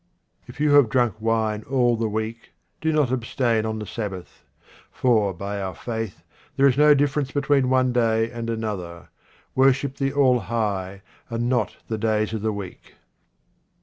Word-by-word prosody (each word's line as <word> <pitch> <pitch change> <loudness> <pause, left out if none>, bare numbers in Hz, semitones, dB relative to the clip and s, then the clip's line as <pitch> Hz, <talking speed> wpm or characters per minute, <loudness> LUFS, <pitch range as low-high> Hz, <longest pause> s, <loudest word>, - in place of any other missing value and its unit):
If - - -12
you 150 0 +2
have 145 -5 +6
drunk 120 -2 +2
wine 110 -1 0
all 125 -3 +3
the 115 -1 -1
week, 110 +2 -5 0.3
do 160 - +1
not 150 -5 +2
abstain 115 -2 0
on 110 0 -3
the 105 - -5
Sabbath; 100 -5 -7 0.5
for, 110 -6 +2
by 100 +3 -5
our 95 -2 -4
faith, 115 -3 -5 0.3
there 135 - +4
is 135 -3 +4
no 150 +1 +6
difference 145 0 0
between 140 -2 +1
one 130 -1 +2
day 115 -1 +1
and 115 -1 -5
another. 100 -7 -5 0.4
Worship 135 +1 +2
the 135 0 0
All 135 -3 +3
high, 100 -3 -3 0.3
and 115 0 -2
not 125 -1 0
the 110 -1 -3
days 110 0 0
of 110 - -3
the 110 +1 0
week. 100 -3 -9
115 Hz, 165 wpm, -23 LUFS, 110-130 Hz, 0.5 s, have